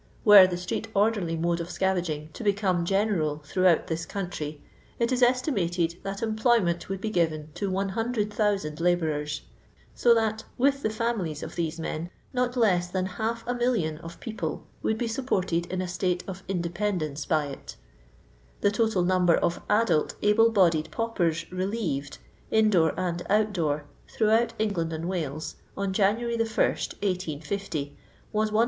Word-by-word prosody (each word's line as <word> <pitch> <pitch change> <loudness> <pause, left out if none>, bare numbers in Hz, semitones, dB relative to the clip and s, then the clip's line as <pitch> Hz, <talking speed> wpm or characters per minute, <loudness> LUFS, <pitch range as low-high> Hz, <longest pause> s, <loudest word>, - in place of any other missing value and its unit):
Were 205 -3 +10
the 180 - -3
st^ee^orderly 200 -1 0
mode 170 +1 +1
of 170 - -4
scavaging 175 -5 -1
to - - -7
become 195 -4 +1
general 175 -7 0
throughout 185 +1 +3
this 165 0 -3
country, 155 -6 -4 0.4
it 235 +1 +1
is 255 0 +1
estimated 185 - +1
that 195 +2 -5
employment 220 -6 +1
would 195 -1 -3
be 215 +2 -3
given 160 -4 0
to 200 +3 -2
100,000 205 -4 -1
labourers, 155 -4 0 0.5
so 235 -1 +4
that, 220 -1 0
with 275 +2 +2
the 215 - 0
families 215 -9 -2
of - - -7
these 165 -1 -2
men, 160 +1 -4 0.2
not 250 0 0
less 185 -7 +3
than 185 +1 -1
half 225 +5 -3
a 245 - -1
million 230 -11 0
of 165 0 -10
people 225 -2 -4 0.2
would 220 - 0
be 235 - -1
supported 190 -8 -1
in 185 +1 -2
a - - -3
state 180 0 -1
of 190 0 -6
inde 175 -3 -2
pendence 175 -8 -2
by 155 -2 +2
it 140 -1 -8 0.9
The 205 - +3
total 220 -4 +1
number 180 -1 +4
of 170 0 0
adult 210 -7 +2
able 225 +2 +5
bodied 170 -8 +3
paupers 175 -8 -1
relieved 185 -7 -2 0.2
— - - -32
in 220 -1 +4
door 165 -5 +3
and 175 -1 -1
out 210 +1 +3
door 150 -5 -1
— - - -31
throughout 225 +2 +3
England 180 -7 -1
and 160 +2 -3
Wales, 155 -4 -3 0.2
on 195 -1 -1
January 225 +4 +1
1, - - -6
1850, 185 -7 -1 0.4
was 215 0 +1
154,625. 215 - +2
190 Hz, 160 wpm, -27 LUFS, 165-220 Hz, 0.9 s, Were